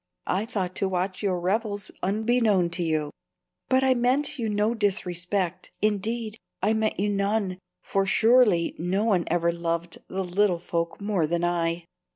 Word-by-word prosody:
I 200 +4 -1
thought 190 -6 -2
to 195 - 0
watch 185 +1 -2
your 190 -4 0
revels 205 +2 -1
unbeknown 210 -3 +2
to 175 +1 -2
you. 155 -3 0 0.6
But 260 0 +3
I 265 -1 +5
meant 255 +4 +1
you 225 -2 -1
no 210 +2 +1
disrespect, 185 -3 -1
indeed, 215 +2 -1 0.2
I 210 +4 +2
meant 220 -2 0
you 205 +1 +1
none, 200 -2 0 0.2
for 195 0 0
surely 220 -6 +4
no 185 +5 0
one 190 -6 +2
ever 170 0 +1
loved 170 0 -3
the 190 +1 -3
little 185 0 +2
folk 170 -1 -3
more 200 -6 0
than 170 +2 -1
I." 170 -1 0
195 Hz, 160 wpm, -26 LUFS, 175-215 Hz, 0.6 s, I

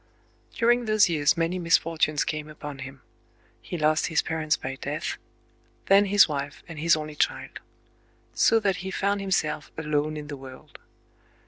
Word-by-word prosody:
During 240 +1 +3
those 215 -3 +4
years 150 -3 +2
many 170 +2 0
misfortunes 165 -3 +2
came 155 0 -4
upon 150 -2 -8
him. 135 0 -9 0.6
He 175 - -6
lost 155 0 +2
his 165 -3 +1
parents 160 -2 0
by 130 0 -6
death,—then 175 +7 -2
his 205 0 +6
wife 140 -2 -5
and 165 -3 -8
his 170 +2 +4
only 155 0 -6
child. 150 - -2 0.7
So 225 - +4
that 195 -3 +1
he 190 - -5
found 200 +1 -1
himself 160 -6 -1
alone 150 -1 -1
in 150 - -6
the 145 -1 -7
world. 130 -1 -13
155 Hz, 150 wpm, -26 LUFS, 150-190 Hz, 0.7 s, his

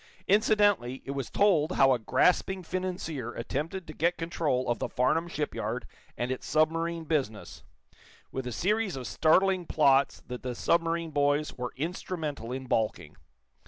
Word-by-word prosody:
Incidentally, 205 - +3
it 140 - -4
was 135 -3 -4
told 180 -5 +3
how 135 -4 +5
a 125 - 0
grasping 180 - +2
financier 170 -9 -4
attempted 160 +10 -4
to 155 - -9
get 170 +4 +1
control 160 -6 -1
of 120 -2 0
the - - -2
Farnum 160 +7 +1
shipyard 125 -7 -3 0.3
and 120 +1 -2
its 130 - -4
submarine 165 +2 +1
business, 135 -10 -3 0.7
with 130 -1 -4
a - - -3
series 205 - 0
of 130 -2 -6
startling 185 +4 +3
plots 140 -3 +3
that 125 0 -7
the 125 -1 -4
submarine 165 +3 +1
boys 145 +1 +1
were 125 -1 -4
instrumental 155 -5 -4
in 130 +1 -4
balking. 110 -3 -1
155 Hz, 150 wpm, -29 LUFS, 130-175 Hz, 0.7 s, how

